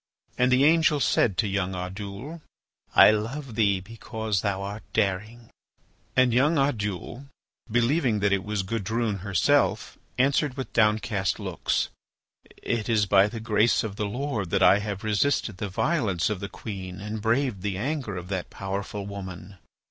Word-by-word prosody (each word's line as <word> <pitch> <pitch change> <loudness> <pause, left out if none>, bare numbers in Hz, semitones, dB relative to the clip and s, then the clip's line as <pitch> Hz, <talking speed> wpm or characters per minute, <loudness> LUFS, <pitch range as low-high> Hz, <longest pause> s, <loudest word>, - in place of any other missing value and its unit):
And 125 0 +2
the 130 +2 +4
angel 155 -1 +4
said 105 -7 +2
to 105 - +2
young 95 -1 -1
Oddoul: 100 - -6 0.5
"I - - +9
love 115 +5 -3
thee 100 -3 +2
because 110 0 -3
thou 100 -1 -1
art 100 +2 -5
daring." 110 +5 -2 0.6
And 130 -2 +4
young 145 +7 +3
Oddoul, 120 -1 -2 0.4
believing 120 0 +2
that 100 0 +3
it 100 - 0
was 105 -2 -2
Gudrune 110 +1 -2
herself, 95 -3 +1 0.2
answered 135 +1 +2
with 130 - -5
downcast 105 -3 +1
looks: - - -1 0.7
"It 115 -1 -2
is 110 -3 +3
by 100 0 +5
the 115 +2 -6
grace 110 +1 +2
of 105 -3 -5
the 105 - -1
Lord 115 -4 -3
that 95 +2 +2
I 100 - +6
have 105 -2 -5
resisted 110 -1 0
the 105 -1 -4
violence 105 - 0
of 105 - -3
the 100 0 -5
queen 95 -3 -7
and 105 +2 -5
braved 115 -2 0
the 100 -1 -2
anger 125 -4 -3
of 90 0 -7
that 95 -3 -3
powerful 100 0 -5
woman." 95 -1 -8
105 Hz, 155 wpm, -26 LUFS, 100-120 Hz, 0.7 s, I